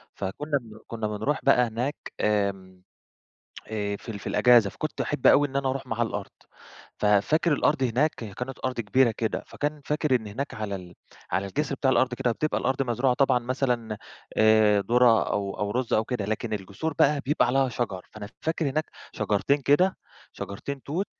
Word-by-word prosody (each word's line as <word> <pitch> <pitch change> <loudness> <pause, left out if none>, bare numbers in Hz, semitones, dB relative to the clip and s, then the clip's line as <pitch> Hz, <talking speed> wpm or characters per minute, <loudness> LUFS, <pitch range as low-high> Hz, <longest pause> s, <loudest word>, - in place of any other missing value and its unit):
فكنا 140 +10 -2
بن- 110 -2 -13
كنا 110 -2 -3
بنرُوح 110 +8 -1
بقى 125 -3 +4
هناك 125 +6 -2 0.3
آمم، 95 -3 -1 0.8
آآ، 105 -2 -2
في 110 - -11
ال 105 -3 -5
في - - -8
الأجازة، 120 -5 +5
فكنت - - -4
أحب - - 0
أوي 145 0 +6
إن 135 - -13
أنا 135 -1 +1
أرُوح 135 0 -3
معاه 115 +1 -2
الأرض، 105 -3 -4 0.7
ففاكر 105 - +3
الأرض 145 -1 +2
هناك 130 +6 +2
كانت 125 +4 -7
أرض 130 -2 -2
كبيرة 115 +3 +3
كده، 110 0 -2
فكان 150 0 -3
فاكر 150 -2 +1
إن 110 -4 -2
هناك 130 +8 -5
على 105 -2 -4
ال 90 -2 -10 0.4
على 95 +1 0
الجسر 140 +7 -2
بتاع 135 0 +1
الأرض 130 -1 +2
كده 125 -1 0
بتبقى 155 +6 -1
الأرض 130 +1 0
مزروعة 125 +1 +1
طبعًا 135 -2 +3
مثلًا 120 -3 -1 0.4
آآ، 110 -1 +5
درة 120 +1 +4
أو 100 -1 -3
أو 105 0 -1
رز 125 +1 -1
أو 110 - +2
كده، 120 -5 -2
لكن 110 +1 -2
الجسور 105 +10 -4
بقى 145 0 +4
بيبقى 150 +3 +2
عليها 135 +1 +2
شجر، 105 -7 -4
فأنا 105 -1 -8
فاكر 160 -2 -1
هناك 155 +3 -1 0.3
شجرتين 105 +7 +1
كده، 180 +8 +3 0.4
شجرتين 135 +7 -6
توت. 170 +8 -2
120 Hz, 180 wpm, -26 LUFS, 105-140 Hz, 0.8 s, أوي